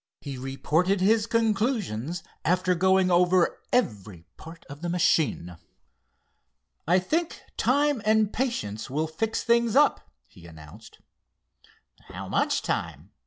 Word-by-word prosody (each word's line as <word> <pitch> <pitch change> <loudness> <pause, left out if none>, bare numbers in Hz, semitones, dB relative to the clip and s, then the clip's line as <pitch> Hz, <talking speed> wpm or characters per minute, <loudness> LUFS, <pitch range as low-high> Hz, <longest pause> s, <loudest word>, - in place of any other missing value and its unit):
He 140 -2 -7
reported 155 +9 0
his 215 +3 +2
conclusions 210 - -1 0.2
after 180 +1 +1
going 190 +1 +2
over 180 0 +2
every 105 - -2
part 165 +1 -13
of 145 +2 -11
the 175 - -3
machine. 155 - 0 1.3
"I 175 +2 +4
think 320 - -2
time 285 -1 +1
and 215 -1 +2
patience 235 - -3
will 150 +4 -1
fix 215 +8 -3
things 235 -1 +2
up," - - +3 0.2
he 85 -1 -16
announced. 80 -2 -14 1.1
"How - - -8
much - - 0
time?" - - -4
180 Hz, 120 wpm, -26 LUFS, 140-220 Hz, 1.3 s, I